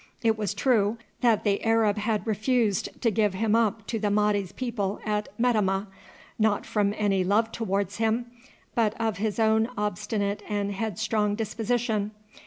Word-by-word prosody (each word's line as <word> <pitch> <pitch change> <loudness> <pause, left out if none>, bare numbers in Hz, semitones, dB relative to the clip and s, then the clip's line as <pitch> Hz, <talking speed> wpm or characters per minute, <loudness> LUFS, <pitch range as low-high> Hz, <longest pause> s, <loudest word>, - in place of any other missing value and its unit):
It 225 -1 +3
was 210 -2 -2
true 220 -2 +2 0.2
that 230 -4 +3
the 200 -2 +1
Arab 225 -2 +3
had 215 0 -1
refused 220 -1 +1
to 230 - +3
give 210 -2 +1
him 215 +2 +1
up 220 -2 +1
to 225 - -2
the 210 -1 0
Mahdi's 205 -2 +1
people 210 -5 -3
at 210 -1 -1
Metemmeh, 210 -5 +2 0.5
not 215 -2 +2
from 205 -1 0
any 195 -3 +2
love 215 +4 +2
towards 200 -3 -2
him, 225 +2 +1 0.5
but 225 -2 +1
of 225 -2 0
his 210 0 -1
own 220 0 +3
obstinate 205 0 -1
and 205 -1 -1
headstrong 210 +1 -1
disposition. 225 -1 -1
215 Hz, 155 wpm, -27 LUFS, 205-225 Hz, 0.5 s, It